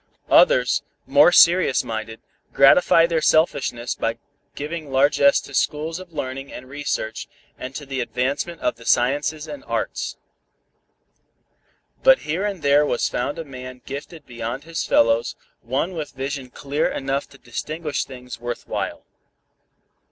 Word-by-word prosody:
Others, - - +5 0.2
more 145 +5 +6
serious 175 -5 +5
minded, 110 0 -5 0.3
gratify 165 +4 +6
their 165 -2 0
selfishness 140 -7 +1
by 115 0 -2 0.4
giving 150 0 -5
largess 140 +1 +4
to 140 - -13
schools 155 +5 -1
of 185 -2 -12
learning 135 -2 -5
and 130 - -9
research, 135 -5 -4 0.3
and 130 +1 -8
to 145 - -6
the 135 -1 -4
advancement 135 +8 -2
of - - -1
the 115 - -14
sciences 145 +5 +1
and 285 -1 -8
arts. - - -3 1.8
But - - +6
here 180 +7 -1
and 195 -5 -5
there 145 +1 +5
was 135 -5 0
found 140 +6 -2
a 165 - -5
man 130 -2 -10
gifted 145 +3 -8
beyond 120 +2 -5
his 165 -1 -3
fellows, 115 +1 +2 0.3
one 135 +9 -1
with 155 -4 -5
vision 135 -1 -5
clear 140 +4 -1
enough 135 +1 -3
to 140 - -16
distinguish 150 +5 -4
things 125 -2 -10
worth 120 0 -5
while. - - -4
140 Hz, 140 wpm, -22 LUFS, 125-155 Hz, 1.8 s, more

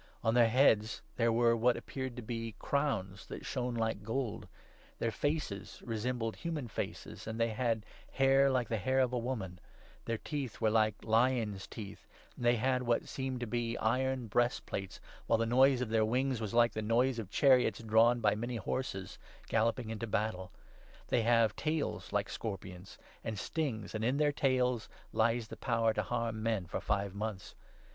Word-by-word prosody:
On 110 - +2
their 120 -1 +5
heads 110 -3 +3
there 115 -1 +2
were 115 0 +4
what 120 +1 +3
appeared 130 -2 -5
to 125 - -6
be 115 -1 -4
crowns 105 -11 -1
that - - -7
shone 125 -2 -2
like 110 -2 -1
gold, 115 +2 -3 0.5
their 115 - -1
faces 145 -6 -3
resembled 115 0 -2
human 160 -7 -3
faces, 105 - -6
and 110 +1 -4
they 115 0 +2
had 110 -1 -1 0.3
hair 135 0 +5
like 125 -3 +1
the 110 -1 -1
hair 130 +6 +1
of 125 -1 +2
a 125 - +1
woman, 110 -8 -4 0.5
their 115 - -1
teeth 140 -2 -4
8 - - -16
were 110 - +4
like 110 -1 +3
lions' 115 -3 +1
teeth, 100 -3 -9 0.3
and - - -8
they 120 0 +5
had 130 +2 +1
what 120 -1 0
seemed 130 -2 -3
to - - -1
be 120 0 -2
iron 130 +3 +1
9 115 - -7
breastplates, 120 -4 -1 0.3
while 115 - +4
the 115 - +1
noise 130 +2 +4
of 125 - -2
their 110 0 +3
wings 125 +2 0
was 105 -3 -3
like 120 0 +5
the 110 - -3
noise 120 +3 +2
of 105 -5 -6
chariots 130 -1 +4
drawn 115 +2 +4
by 105 -2 +4
many 120 +3 -3
horses, 95 -3 -4 0.3
galloping 115 +1 +1
into 115 +1 -4
battle. 100 -4 -2 0.6
They 120 - +3
10 - - -2
have 115 -2 +4
tails 140 - -2
like 100 -1 0
scorpions, 95 -3 -6 0.3
and 110 -2 -3
stings, 120 - -3
and 110 0 -2
in 125 +4 +2
their 150 0 +3
tails 125 -5 +1 0.2
lies 115 0 +1
their - - -8
power 115 -3 +1
to 105 - 0
harm 115 +1 -2
men 110 -4 0
for 85 - -4
five 100 -1 -1
months. 100 -2 -5
115 Hz, 185 wpm, -33 LUFS, 110-125 Hz, 0.6 s, their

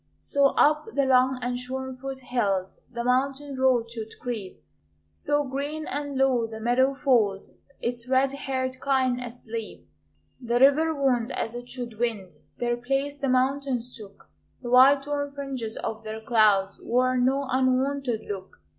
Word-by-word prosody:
So 280 0 +3
up 300 +6 +4
the 280 - +3
long 260 0 +4
and 245 0 -2
shorn 260 +1 -5
foot 265 +1 -7
hills 200 -7 -1
The 235 -1 -4
mountain 270 +3 0
road 255 -3 +2
should 225 -2 -7
creep; 225 -6 -6 0.5
So, 290 -2 0
green 285 +3 -4
and 285 0 -4
low, 260 -4 +2
the 220 -1 -8
meadow 255 +4 +2
fold 230 -9 +1 0.3
Its 240 +1 -4
red 265 +1 +3
haired 260 -2 -3
kine 260 -3 +1
asleep. 230 - -7 0.5
The 240 0 0
river 285 +5 +5
wound 255 -5 +1
as 225 - -3
it 245 0 -8
should 240 -3 -6
wind; 220 -6 -2 0.3
Their 240 0 -1
place 275 +4 -2
the 275 -1 -1
mountains 255 -1 0
took; 200 -3 -13 0.4
The 240 - -4
white 270 +2 +7
torn 285 0 -3
fringes 265 -6 -5
of 220 0 -4
their 220 0 -5
clouds 215 -4 +2
Wore 255 +1 +2
no 265 +3 +2
unwonted 260 -1 +1
look. 190 -2 -6
255 Hz, 155 wpm, -26 LUFS, 235-275 Hz, 0.5 s, white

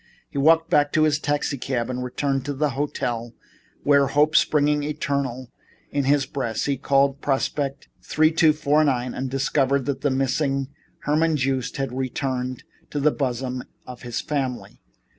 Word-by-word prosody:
He - - -6
walked 165 +3 +4
back 145 0 +3
to 155 - +4
his 155 -1 +2
taxicab 135 -4 -1
and 125 0 -3
returned 135 +2 -1
to 145 - -3
the 150 +1 0
hotel 120 -4 -3 0.5
where, 140 -1 +4
hope 150 +3 +2
springing 150 -1 +3
eternal 140 -4 -3 0.4
in 140 -2 0
his 140 0 +3
breast, 120 -5 -3
he 140 - +1
called 140 +1 +1
Prospect 140 0 -1
3249 155 -4 +2
again - - -6
and 130 +1 -3
discovered 135 0 +1
that 135 -1 -2
the 145 - +2
missing 135 +1 0 0.3
Herman 155 +2 +2
Joost 130 0 -1
had 135 -2 -2
returned 130 -1 -3 0.3
to 145 - -3
the 150 +2 +3
bosom 125 -2 -2 0.2
of 125 -1 -10
his 120 -1 -4
family. 135 -5 -4
140 Hz, 150 wpm, -23 LUFS, 130-145 Hz, 0.5 s, walked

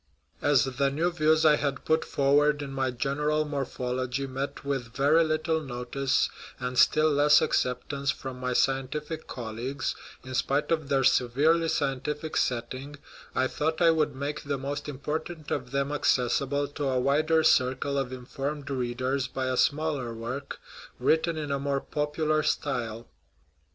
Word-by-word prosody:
As 145 -4 +4
the 135 +1 0
new 160 +6 0
views 155 -1 +3
I 150 -1 +6
had 140 -1 -2
put 160 0 +2
forward 145 +1 +2
in 140 - -6
my 135 -1 0
General 150 +5 0
Morphology 130 -2 -2
met 135 +2 -5
with 135 -4 -2
very 145 +5 +4
little 155 0 0
notice, 130 0 0 0.3
and 125 0 -3
still 155 0 +5
less 145 +1 +6
acceptance, 140 +2 -1
from 130 -2 -4
my 125 0 -1
scientific 135 +5 -1
colleagues, 125 +4 -4 0.3
in 130 0 -8
spite 140 +4 0
of 155 -4 0
their 135 -1 +2
severely 150 +8 +3
scientific 150 +1 -2
setting, 130 +4 -2 0.4
I 130 - +2
thought 160 +4 -1
I 170 -1 +6
would 155 -3 +1
make 145 +2 -4
the 140 -1 -2
most 140 +2 -4
important 150 +3 -5
of 125 -3 -2
them 140 +2 -1
accessible 140 0 +1
to 145 0 -4
a 130 -1 +1
wider 155 +5 +3
circle 130 +1 +2
of 130 -2 -3
informed 140 +3 -5
readers 130 +1 -1
by 130 +1 -3
a 130 - 0
smaller 145 -4 0
work, 130 +5 -5 0.4
written 160 +1 +2
in 150 -2 -3
a 140 - 0
more 140 0 0
popular 150 +2 0
style. 120 -7 -2
140 Hz, 150 wpm, -28 LUFS, 130-150 Hz, 0.4 s, I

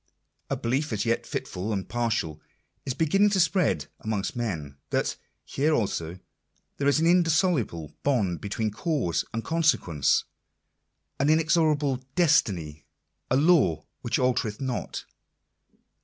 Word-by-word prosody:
A - - -1
belief, 135 +5 -1
as 105 0 -1
yet 115 0 0
fitful 95 +5 -4
and 95 -3 -2
partial, 110 -10 -1 0.5
is 130 - -1
beginning 195 +6 +3
to 200 -2 +1
spread 170 - +2
amongst 110 -1 -3
men, 80 - -4
that - - 0 0.3
here 150 +3 +1
also 90 - -2 0.6
there 140 - 0
is 145 +1 +4
an 160 - +2
indissoluble 165 - +2
bond 105 - 0
between 105 +1 -2
cause 120 - -1
and 115 0 -3
con 165 +1 -1
sequence, 85 - +2 1.0
an 140 +2 +2
inexorable 155 -3 +3 0.2
destiny, 95 - +2 0.5
a 125 - +3
" - - +4
law 85 - +3 0.2
which - - 0
altereth 120 -4 0
not." 130 -4 -4
120 Hz, 130 wpm, -26 LUFS, 95-155 Hz, 1.0 s, is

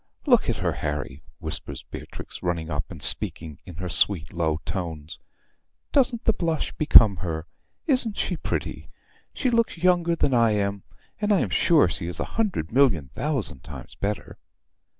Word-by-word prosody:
"Look 245 - +4
at 120 - +1
her, 90 -2 -1
Harry," 75 -1 -4 0.2
whispers - - -2
Beatrix, - - -9
running 85 -2 -2
up, 75 - -3
and - - -8
speaking 80 -3 +1
in 90 - -9
her 90 +3 -5
sweet 90 -1 0
low 80 -3 0
tones. 80 -5 -5 0.7
"Doesn't 255 -4 +2
the 225 - +4
blush 165 -5 -1
become 110 -10 +6
her? 80 -2 -4 0.4
Isn't 255 -8 +2
she - - -1
pretty? - - -4 0.4
She 255 - -1
looks 230 -5 +1
younger 175 -1 +2
than 140 - +1
I 115 -2 +4
am, 100 -1 -1 0.4
and 210 0 0
I 200 - +4
am - - -2
sure 165 - +4
she 85 0 -4
is 90 - -1
a - - -1
hundred 205 - -1
million 110 - +3
thousand 135 - -2
times - - -10
better." 100 +1 -4
100 Hz, 165 wpm, -25 LUFS, -, 0.7 s, become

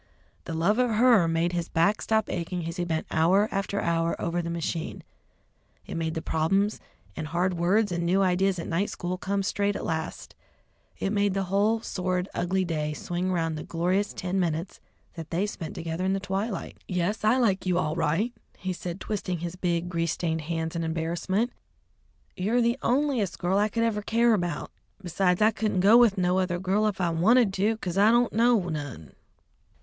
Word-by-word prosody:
The 165 - -4
love 195 +8 +2
of 250 -1 +3
her 230 -6 +5
made 165 +1 +1
his 175 -1 -3
back 190 +6 +2
stop 220 -1 +1
aching 175 0 -3
as 165 +2 -5
he 175 - -1
bent 160 -2 -2
hour 185 +6 +3
after 200 +1 -1
hour 165 -1 0
over 170 +1 -1
the 170 - -4
machine; 170 -1 -3 0.8
it - - -7
made 160 -1 -2
all - - -8
the 160 - -2
problems 195 +6 +1 0.4
and 155 - -4
hard 175 +4 0
words 185 +5 +2
and 175 0 -1
new 185 +3 +2
ideas 190 +1 +2
at 165 - -5
night 185 +5 0
school 180 0 -3
come 200 0 -1
straight 205 +1 0
at - - -4
last; 160 0 -4 0.6
it 195 - -2
made 200 -2 +1
the 195 - 0
whole 215 +3 +2
sordid, 185 -2 -2
ugly 185 +2 0
day 155 -3 -2
swing 175 +4 -3
round 165 -3 0
the - - -6
glorious 185 +5 0
ten 185 +1 -2
minutes 170 0 -2 0.3
that 165 -2 -8
they 180 +5 0
spent 170 -6 -6
together 165 +2 -4
in 190 +1 +1
the 195 - 0
twilight. 195 +1 -4
"Yes, 180 +4 -1
I 220 +4 +4
like 200 -7 +1
you 180 -1 +2
all 155 -3 0
right," 175 +9 0 0.2
he 185 0 -3
said, 175 +1 -6
twisting 190 -4 -3
his 170 +1 -5
big, 175 -1 -1
grease 170 -2 -1
stained 160 -2 -2
hands 160 +1 -3
in 165 - -1
embarrassment. 170 +8 -1 0.8
"You're 210 +6 +1
the 235 +2 +1
onliest 255 -6 +1
girl 185 +3 +1
I 210 +1 +2
ever 230 -2 +1
could - - -22
care 235 +1 +4
about. 175 -6 -2 0.3
Besides, 180 +2 +1
I 215 - +5
couldn't 215 -4 -1
go 205 +4 +6
with 235 -4 +6
no 180 0 +2
other 180 -2 0
girl 190 +4 +1
if 205 -3 -2
I 175 -2 +1
wanted 205 +6 +4
to, 210 +4 +1
'cause 185 -3 -3
I 210 +2 +6
don't 240 +1 +3
know 230 -4 +3
none." 145 - -6
185 Hz, 195 wpm, -27 LUFS, 170-205 Hz, 0.8 s, go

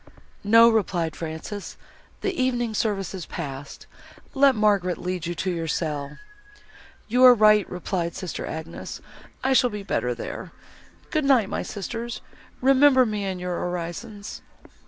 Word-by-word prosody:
"No," 230 +3 +7
replied 180 -8 +1
Frances, 165 +5 -6 0.4
"the 395 - -1
evening 245 -6 0
service 200 -4 -1
is 185 -3 -6
passed. 140 -4 -7 0.5
Let 275 -1 +5
Margaret 200 -4 +2
lead 180 -2 -4
you 175 - -3
to 185 +3 -2
your 165 -2 -3
cell." 150 -3 -3 0.9
"You 250 +3 +3
are 250 -1 +10
right," 215 -2 +5
replied 180 -1 -3
sister 185 -4 -5
Agnes, 160 +1 -6 0.4
"I 265 +1 +3
shall 250 -1 +4
be 210 -2 -6
better 125 -10 -1
there. - - -7 0.6
Good 310 -2 +1
night, 250 -8 +4
my - - -2
sisters, 230 +4 -5 0.4
remember 265 0 +6
me 210 -3 -2
in 190 -1 -3
your 180 -1 -3
orisons." 180 +5 -5
200 Hz, 140 wpm, -24 LUFS, 170-235 Hz, 0.9 s, are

